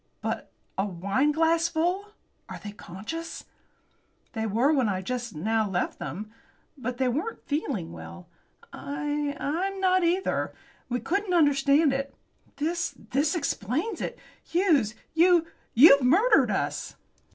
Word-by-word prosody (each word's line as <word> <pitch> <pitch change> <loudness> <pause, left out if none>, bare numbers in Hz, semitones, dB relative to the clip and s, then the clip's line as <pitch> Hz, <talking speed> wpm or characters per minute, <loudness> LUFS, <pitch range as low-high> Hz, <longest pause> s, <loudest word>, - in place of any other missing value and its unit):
"But - - -4 0.3
a 195 - +2
wineglassful! 320 - +1 0.4
Are - - -6
they 205 - -6
conscious?" 215 - -7 0.9
"They 220 -1 -2
were 240 +9 +3
when 260 -7 +2
I 190 -1 -2
just 245 -1 -4
now 220 +6 0
left 180 -2 -2
them. 215 +4 -6 0.4
But 250 -3 -4
they 260 0 +1
weren't 310 - -3
feeling 280 - -2
well. 85 +1 -10 0.5
I 290 0 -3
I'm 375 +7 -2
not 370 -1 +3
either. 355 +3 0 0.3
We 245 0 -1
couldn't 390 0 0
understand 285 -1 +4
it. 275 +1 -3 0.4
This 335 +5 -2 0.2
this 295 +6 +2
explains 305 - -2
it. - - -4 0.3
Hughes, 310 - +2 0.2
you 340 0 +5 0.3
you've 275 +3 +9
murdered 365 - +4
us!" - - -2
285 Hz, 125 wpm, -27 LUFS, 225-335 Hz, 0.9 s, you've